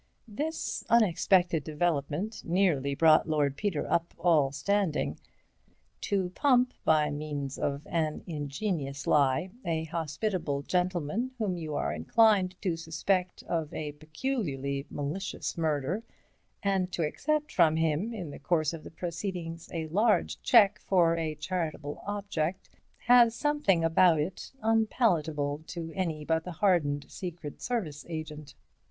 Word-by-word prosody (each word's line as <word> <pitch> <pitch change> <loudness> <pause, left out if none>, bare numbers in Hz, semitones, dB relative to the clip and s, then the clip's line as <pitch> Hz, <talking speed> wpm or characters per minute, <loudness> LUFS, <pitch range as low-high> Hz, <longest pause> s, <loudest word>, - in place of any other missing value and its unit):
This 300 +9 -3
unexpected 180 -6 +3
development 155 +5 -1
nearly 165 -7 +1
brought 160 +1 +5
Lord 145 -3 +1
Peter 195 -4 -1
up 170 0 -1
all 155 -6 +3
standing. 175 +3 0 0.9
To 190 -3 0
pump, 250 +2 +3
by 150 -1 +3
means 145 -2 -4
of 140 +1 -2
an 155 -2 -1
ingenious 145 -2 -3
lie, 145 +5 +2
a 165 -2 -1
hospitable 160 -1 -2
gentleman 180 - -1
whom 210 -5 -1
you 155 -3 -4
are - - -1
inclined 200 -5 +3
to 180 -4 +1
suspect 180 +3 -1
of 160 -3 -2
a 150 -1 -3
peculiarly 150 - -3
malicious 150 +7 -4
murder, 160 +3 -1 0.6
and 190 -2 +1
to 165 - 0
accept 300 - -1
from 165 -4 +4
him 160 +6 0
in 185 -10 -6
the - - -9
course 155 -3 +1
of 165 - -7
the - - -9
proceedings 170 -1 -5
a 165 -2 -3
large 210 +6 +2
cheque 210 -4 +5
for 170 -3 +3
a 160 -2 -2
charitable 155 -3 -4
object, 195 -4 -3 0.3
has 240 -1 +6
something 290 - +2
about 165 0 +5
it 170 +5 -4
unpalatable 165 - +1
to 165 -2 -6
any 160 -5 -2
but 160 0 +1
the 180 - -6
hardened 155 -6 +1
Secret 170 -5 -7
Service 185 - -3
agent. 150 -3 -6
165 Hz, 130 wpm, -29 LUFS, 150-195 Hz, 0.9 s, has